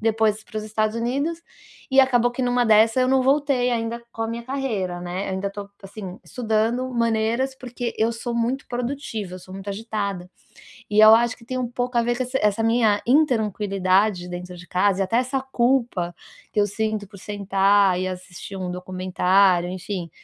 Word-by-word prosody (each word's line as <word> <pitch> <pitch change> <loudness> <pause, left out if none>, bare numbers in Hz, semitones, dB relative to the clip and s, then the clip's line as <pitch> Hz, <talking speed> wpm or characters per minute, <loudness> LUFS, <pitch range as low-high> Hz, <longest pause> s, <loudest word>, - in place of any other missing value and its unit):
depois 220 -1 +1
para 220 - -10
os - - -4
Estados 215 0 -1
Unidos 280 +9 -2 0.5
e 265 - +2
acabou 245 -3 +5
que 245 +2 -3
numa 245 0 +2
dessa 220 +2 +5
eu 255 - +3
não 265 0 +3
voltei 270 -2 +2
ainda 230 0 -2
com 225 - -4
a 225 - -2
minha 235 +1 -5
carreira, 225 -10 -3
né, 180 +2 -4
eu - - -3
ainda 190 +1 -2
tô, 200 0 -8
assim, 195 -1 -8
estudando 230 +2 0
maneiras, 230 +3 0
porque 245 -2 -5
eu 225 +1 +2
sou 235 +1 -5
muito 235 +3 -1
produtiva, 240 -6 -4
eu - - -7
sou 185 - -13
muito 195 +1 -8
agitada 200 -3 -4 0.6
e 210 - +1
eu 215 +1 +10
acho 235 0 +2
que 230 - -17
tem 255 +2 -4
um 250 -1 -2
pouco 245 0 -3
a 235 - +4
ver 240 +1 0
com 255 - -1
esse 255 +2 -3
essa 210 +1 +2
minha 225 -3 +3
intranquilidade 210 - +2
dentro 180 0 -7
de 180 +1 -12
casa 190 +2 +1
e - - +4
até 225 +5 +1
essa 255 +2 0
culpa 240 -8 0 0.4
que 210 - +2
eu 205 - +3
sinto 215 0 -2
por 200 0 -14
sentar 195 -2 +2
e 185 - -1
assistir 185 +1 -8
um 185 -1 -4
documentário, 185 0 +2
enfim, 180 -1 -5
220 Hz, 195 wpm, -23 LUFS, 195-245 Hz, 0.6 s, eu